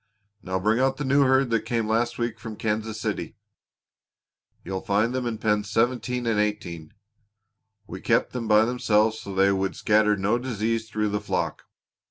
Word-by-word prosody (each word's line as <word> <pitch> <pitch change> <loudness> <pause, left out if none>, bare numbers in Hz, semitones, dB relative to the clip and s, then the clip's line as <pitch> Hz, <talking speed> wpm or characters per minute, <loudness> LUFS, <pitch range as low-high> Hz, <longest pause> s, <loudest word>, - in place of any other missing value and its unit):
Now 95 0 -2
bring 110 +5 +1
out 135 0 +2
the 145 - -3
new 140 +2 +3
herd 130 -1 +3
that 115 - +3
came 115 -3 -1
last 115 +2 0
week 120 -2 -3
from 110 -1 -7
Kansas 110 0 -2
City. - - -3 1.3
You'll 95 0 -4
find 105 +4 +1
them 130 -1 -2
in 115 -2 -3
pens 105 -1 0
seventeen 120 +2 0
and 115 -2 +1
eighteen. 95 -7 -3 0.9
We - - -8
kept - - +1
them 120 -3 -3
by 105 0 +5
themselves 110 -2 +1
so 100 - -7
they 95 +1 +4
would 95 0 -1
scatter 105 -1 +3
no 105 +5 +1
disease 115 -2 -2
through 105 -1 -1
the 105 0 -2
flock. 105 - -3
110 Hz, 175 wpm, -25 LUFS, 105-120 Hz, 1.3 s, by